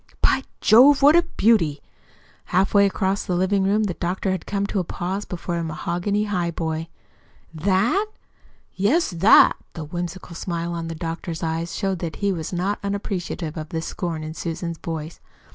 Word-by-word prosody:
"By -, -, +3 dB, 0.2 s
Jove, 270 Hz, +6 st, +6 dB
what 295 Hz, +3 st, +8 dB
a 345 Hz, -, +7 dB
beauty!" 215 Hz, -, +2 dB, 0.7 s
Halfway 200 Hz, +2 st, +3 dB
across 195 Hz, 0 st, -1 dB
the 180 Hz, -, -2 dB
living 190 Hz, +2 st, +2 dB
room 205 Hz, +3 st, +2 dB
the 200 Hz, -4 st, -1 dB
doctor 180 Hz, +3 st, -2 dB
had 185 Hz, -2 st, -4 dB
come 200 Hz, -1 st, -1 dB
to 200 Hz, -, -1 dB
a -, -, 0 dB
pause 185 Hz, +4 st, -4 dB
before 175 Hz, -1 st, -4 dB
the 170 Hz, -, -2 dB
mahogany 175 Hz, +6 st, -1 dB
highboy. 170 Hz, -4 st, -2 dB, 0.7 s
"THAT?" 200 Hz, -, +1 dB, 0.7 s
"Yes, 260 Hz, -, +2 dB
'that'!" 180 Hz, +5 st, +6 dB, 0.2 s
The 160 Hz, -, -5 dB
whimsical 175 Hz, +2 st, -6 dB
smile 170 Hz, -1 st, -3 dB
in 165 Hz, 0 st, -4 dB
the 165 Hz, -, -5 dB
doctor's 165 Hz, 0 st, -5 dB
eyes 165 Hz, +1 st, -2 dB
showed 195 Hz, -3 st, -1 dB
that 165 Hz, -2 st, -4 dB
he 200 Hz, -1 st, 0 dB
was 165 Hz, -4 st, -4 dB
not 190 Hz, +3 st, -1 dB
unappreciative 195 Hz, -5 st, -3 dB
of 155 Hz, -1 st, -6 dB
the 165 Hz, -, -2 dB
scorn 165 Hz, -1 st, -4 dB
in 155 Hz, 0 st, -5 dB
Susan's 170 Hz, 0 st, -4 dB
voice. 160 Hz, -1 st, -5 dB
180 Hz, 165 wpm, -23 LUFS, 165-200 Hz, 0.7 s, what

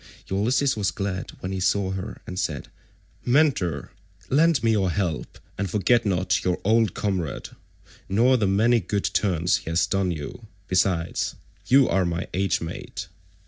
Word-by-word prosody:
Ulysses 125 Hz, +8 st, +2 dB
was 105 Hz, -3 st, 0 dB
glad 95 Hz, -2 st, -4 dB
when 90 Hz, -, -4 dB
he 95 Hz, -, -2 dB
saw 95 Hz, +1 st, +1 dB
her 95 Hz, +2 st, -6 dB
and 90 Hz, 0 st, -5 dB
said, 75 Hz, -9 st, -3 dB, 0.5 s
"Mentor, 120 Hz, -, +1 dB, 0.4 s
lend 160 Hz, +1 st, +4 dB
me 115 Hz, -, +3 dB
your 100 Hz, -4 st, +2 dB
help, 85 Hz, -4 st, -2 dB, 0.2 s
and 100 Hz, -, -1 dB
forget 110 Hz, +4 st, +2 dB
not 90 Hz, -1 st, +1 dB
your 90 Hz, -1 st, 0 dB
old 110 Hz, -1 st, +2 dB
comrade, 95 Hz, -7 st, -2 dB, 0.6 s
nor 120 Hz, +7 st, +4 dB
the 110 Hz, -5 st, +1 dB
many 110 Hz, +5 st, +3 dB
good 100 Hz, +1 st, -2 dB
turns 90 Hz, -3 st, +1 dB
he -, -, -8 dB
has 80 Hz, +2 st, +2 dB
done 95 Hz, -1 st, 0 dB
you. 85 Hz, -, -6 dB, 0.2 s
Besides, 90 Hz, -2 st, 0 dB, 0.3 s
you 135 Hz, +3 st, +6 dB
are 95 Hz, -, +2 dB
my 85 Hz, -1 st, -2 dB
age 95 Hz, +1 st, 0 dB
mate." 85 Hz, +2 st, -6 dB
95 Hz, 155 wpm, -24 LUFS, 90-110 Hz, 0.6 s, you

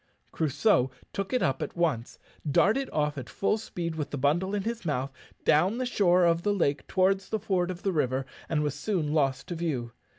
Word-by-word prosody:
Crusoe 150 Hz, -, +2 dB, 0.2 s
took 195 Hz, -1 st, -3 dB
it 255 Hz, -, +1 dB
up 135 Hz, -, 0 dB
at -, -, -5 dB
once, 150 Hz, -9 st, 0 dB, 0.3 s
darted 225 Hz, -, +3 dB
off 150 Hz, -1 st, 0 dB
at 125 Hz, -, -8 dB
full 210 Hz, +2 st, 0 dB
speed 170 Hz, -6 st, -4 dB
with 150 Hz, -2 st, -3 dB
the 145 Hz, -, -4 dB
bundle 170 Hz, +9 st, +1 dB
in 200 Hz, -, -1 dB
his 230 Hz, 0 st, -3 dB
mouth, 140 Hz, -4 st, -1 dB, 0.3 s
down 185 Hz, +9 st, +4 dB
the 255 Hz, -, -1 dB
shore 180 Hz, -7 st, +3 dB
of 170 Hz, 0 st, +3 dB
the 205 Hz, +2 st, +1 dB
lake 145 Hz, -6 st, 0 dB
towards 190 Hz, 0 st, +2 dB
the 220 Hz, -, 0 dB
ford 185 Hz, -3 st, 0 dB
of 180 Hz, -1 st, -6 dB
the 195 Hz, -, +1 dB
river, 130 Hz, -3 st, 0 dB, 0.2 s
and 150 Hz, -2 st, +1 dB
was 145 Hz, -2 st, 0 dB
soon 165 Hz, -8 st, -1 dB
lost 135 Hz, -4 st, +1 dB
to 175 Hz, -, -3 dB
view. 145 Hz, -9 st, -2 dB
170 Hz, 205 wpm, -28 LUFS, 145-195 Hz, 0.3 s, down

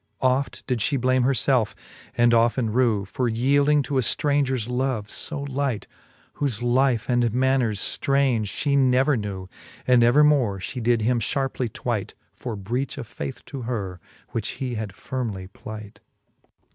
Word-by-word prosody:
Oft 130 Hz, +2 st, 0 dB
did 125 Hz, -2 st, -1 dB
fhe 140 Hz, +5 st, +1 dB
blame 130 Hz, +1 st, +2 dB
her 130 Hz, +3 st, +3 dB
felfe, 125 Hz, -4 st, +2 dB, 0.4 s
and 120 Hz, 0 st, +5 dB
often 115 Hz, 0 st, +2 dB
rew, 115 Hz, -5 st, +2 dB
For 120 Hz, +5 st, -1 dB
yeelding 140 Hz, +5 st, +3 dB
to 135 Hz, 0 st, 0 dB
a -, -, +3 dB
ftraungers 135 Hz, -2 st, +1 dB
love 125 Hz, -4 st, -1 dB
lb 145 Hz, -3 st, -3 dB
light, 135 Hz, -4 st, -2 dB, 0.5 s
Whole 120 Hz, -5 st, -1 dB
life 125 Hz, -2 st, +2 dB
and 120 Hz, -2 st, +2 dB
manners 130 Hz, -4 st, +2 dB
ftraunge 135 Hz, -6 st, +1 dB, 0.2 s
Ihe 140 Hz, -1 st, +3 dB
never 135 Hz, +1 st, +4 dB
knew 100 Hz, -4 st, -4 dB, 0.2 s
\ -, -, -21 dB
And 125 Hz, -1 st, +5 dB
evermore 135 Hz, -3 st, +4 dB
Ihe 120 Hz, +7 st, -5 dB
did 115 Hz, -1 st, +2 dB
him 120 Hz, +1 st, +2 dB
Iharpely 130 Hz, +1 st, -1 dB
tvvight -, -, -3 dB, 0.2 s
For 120 Hz, -3 st, -5 dB
breach 120 Hz, +9 st, -3 dB
of 130 Hz, -, -5 dB
faith 130 Hz, +4 st, -7 dB
to 135 Hz, -2 st, -7 dB
her, 105 Hz, -7 st, -4 dB, 0.3 s
which 115 Hz, -1 st, -3 dB
he 130 Hz, -2 st, -3 dB
had 110 Hz, -2 st, -3 dB
firmely 100 Hz, -4 st, -5 dB
plight. 105 Hz, -1 st, -9 dB
125 Hz, 160 wpm, -24 LUFS, 110-135 Hz, 0.5 s, and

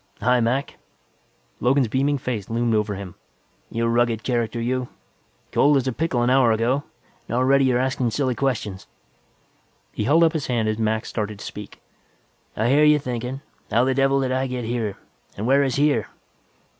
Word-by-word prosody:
"Hi, 125 Hz, +1 st, +3 dB
Mac." 125 Hz, +4 st, -1 dB, 0.8 s
Logan's 130 Hz, +1 st, +2 dB
beaming 140 Hz, +5 st, +1 dB
face 120 Hz, -6 st, -4 dB
loomed 115 Hz, 0 st, 0 dB
over 105 Hz, -1 st, 0 dB
him. 95 Hz, -2 st, -8 dB, 0.6 s
"You 115 Hz, +1 st, -1 dB
rugged 115 Hz, -1 st, +1 dB
character, 120 Hz, -2 st, -1 dB
you. 125 Hz, +2 st, -1 dB, 0.6 s
Cold 145 Hz, 0 st, +4 dB
as 135 Hz, -, 0 dB
a -, -, +1 dB
pickle 135 Hz, -4 st, 0 dB
an 120 Hz, -, +2 dB
hour 130 Hz, -3 st, +4 dB
ago, 120 Hz, +5 st, +1 dB, 0.5 s
and 115 Hz, -, -2 dB
already 135 Hz, +2 st, +4 dB
you're 125 Hz, -2 st, +2 dB
askin' 130 Hz, -1 st, 0 dB
silly 130 Hz, +3 st, 0 dB
questions." 110 Hz, -6 st, -3 dB, 1.0 s
He 105 Hz, -, -3 dB
held 160 Hz, +7 st, +4 dB
up 165 Hz, 0 st, +3 dB
his 155 Hz, -4 st, -3 dB
hand 115 Hz, -3 st, 0 dB
as 110 Hz, +1 st, -1 dB
Mac 110 Hz, 0 st, 0 dB
started 105 Hz, -2 st, -4 dB
to -, -, -9 dB
speak. 105 Hz, -1 st, -9 dB, 0.7 s
"I 110 Hz, -, +1 dB
hear 145 Hz, +3 st, +4 dB
you 150 Hz, 0 st, +6 dB
thinkin'. 125 Hz, 0 st, -4 dB, 0.3 s
'How 115 Hz, +3 st, +3 dB
the 130 Hz, +1 st, +1 dB
devil 135 Hz, +1 st, +2 dB
did 130 Hz, -1 st, -1 dB
I 130 Hz, +1 st, 0 dB
get 125 Hz, -2 st, -4 dB
here, 110 Hz, -4 st, -2 dB, 0.4 s
and 105 Hz, -, -3 dB
where 135 Hz, +3 st, +4 dB
is 135 Hz, -3 st, 0 dB
here?' 145 Hz, +1 st, +2 dB
125 Hz, 180 wpm, -23 LUFS, 115-135 Hz, 1.0 s, you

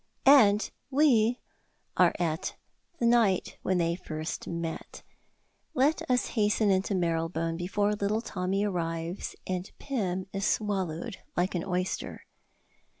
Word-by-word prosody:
And 220 Hz, -7 st, +6 dB, 0.2 s
we 250 Hz, -5 st, +4 dB, 0.6 s
are -, -, +4 dB
at 165 Hz, -1 st, -2 dB, 0.4 s
the 235 Hz, -, 0 dB
night 230 Hz, -6 st, +3 dB
when 185 Hz, -, +1 dB
they 170 Hz, -1 st, +1 dB
first 155 Hz, -3 st, -5 dB
met! 170 Hz, -1 st, -5 dB, 0.7 s
Let 285 Hz, +4 st, +3 dB
us 250 Hz, -1 st, +2 dB
hasten 210 Hz, -2 st, +2 dB
into 190 Hz, +1 st, +1 dB
Marylebone 165 Hz, -1 st, 0 dB
before 205 Hz, +4 st, 0 dB
little 210 Hz, +2 st, 0 dB
Tommy 190 Hz, 0 st, -1 dB
arrives 170 Hz, -2 st, -3 dB
and 185 Hz, +1 st, -3 dB
Pym 190 Hz, -9 st, -2 dB
is 195 Hz, 0 st, -2 dB
swallowed 190 Hz, -5 st, -1 dB, 0.2 s
like 180 Hz, +2 st, +1 dB
an 175 Hz, -2 st, -1 dB
oyster. 180 Hz, 0 st, -3 dB
190 Hz, 120 wpm, -29 LUFS, 170-215 Hz, 0.7 s, And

